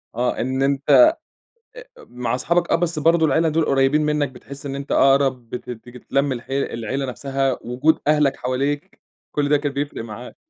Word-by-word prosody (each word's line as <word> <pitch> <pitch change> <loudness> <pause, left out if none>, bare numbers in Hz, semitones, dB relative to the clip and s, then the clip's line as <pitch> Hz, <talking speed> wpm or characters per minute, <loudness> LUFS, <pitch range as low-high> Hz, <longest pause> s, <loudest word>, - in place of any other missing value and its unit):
آه، 125 +1 -1
إن 130 +2 -2
أنت 140 0 -1
آآ 310 +1 +8 0.9
مع 125 0 -4
صحابك 170 +6 0
آه، - - +5
بس 170 -2 -1
برضه 165 +2 +3
العيلة 160 +1 +2
دول 160 +1 +1
قريّبين 135 +2 +2
منك، 150 -2 0
بتحس 140 +2 -11
إن 135 -1 -4
أنت 140 0 -6
أقرَب 135 -3 +3
بتت 125 - -7 0.2
بتتلم 135 +3 -2
الحي 130 +2 -4
العيلة 130 +1 -3
نفسها، 135 0 -2
وجود 130 +7 +1
أهلك 150 -2 +3
حواليك، 140 +7 -3 0.3
كل 145 -1 -1
ده 150 - +4
كان 145 0 -2
بيفرِق 140 -4 -4
معاك. 115 +2 -9
140 Hz, 170 wpm, -21 LUFS, 130-150 Hz, 0.9 s, آآ